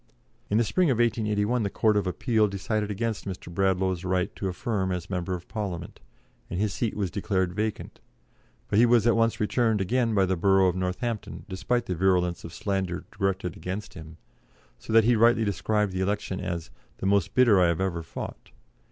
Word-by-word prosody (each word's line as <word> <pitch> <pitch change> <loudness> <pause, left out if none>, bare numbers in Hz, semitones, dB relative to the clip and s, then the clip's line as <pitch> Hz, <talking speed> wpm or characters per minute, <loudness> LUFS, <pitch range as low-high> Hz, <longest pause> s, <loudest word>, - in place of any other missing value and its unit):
In 105 - +2
the 115 - +4
spring 170 - +2
of 125 - +2
1881 110 0 +1
the 100 - 0
Court 110 +1 +2
of 100 -2 +1
Appeal 110 +3 +1
decided 100 +2 -2
against 105 0 -2
Mr. 90 -2 -7
Bradlaugh's 95 -1 +1
right 95 0 -1
to 95 - -3
affirm 95 0 -2
as 90 0 -4
Member 90 0 -2
of 90 - -9
Parliament, 95 -6 -5 0.5
and 90 - -3
his 105 -1 0
seat 115 -3 -2
was 95 -5 -1
declared 95 -2 -1
vacant, 110 +2 -3 0.7
but 100 - +2
he 120 - +7
was 115 -2 +4
at 120 - +4
once 115 0 +2
returned 110 0 +1
again 115 +3 +1
by 95 -1 +4
the 95 0 0
borough 95 +1 +4
of 90 - -2
Northampton, 95 +5 -3
despite 105 +5 -1
the 95 - -2
virulence 90 -1 +1
of 85 - -8
slander 95 -1 -2
directed 95 -4 -2
against 95 +3 -6
him, 80 -2 -11 0.6
so 60 - -8
that 115 0 +6
he 120 +2 +4
rightly 115 0 +4
described 105 +1 0
the 95 0 -2
election 95 -1 -2
as 85 -2 -4 0.3
"the - - -5
most 100 -3 +2
bitter 115 -7 +5
I 90 - +5
have 85 -1 0
ever 95 -3 -1
fought." 80 - -8
100 Hz, 195 wpm, -26 LUFS, 90-110 Hz, 0.7 s, he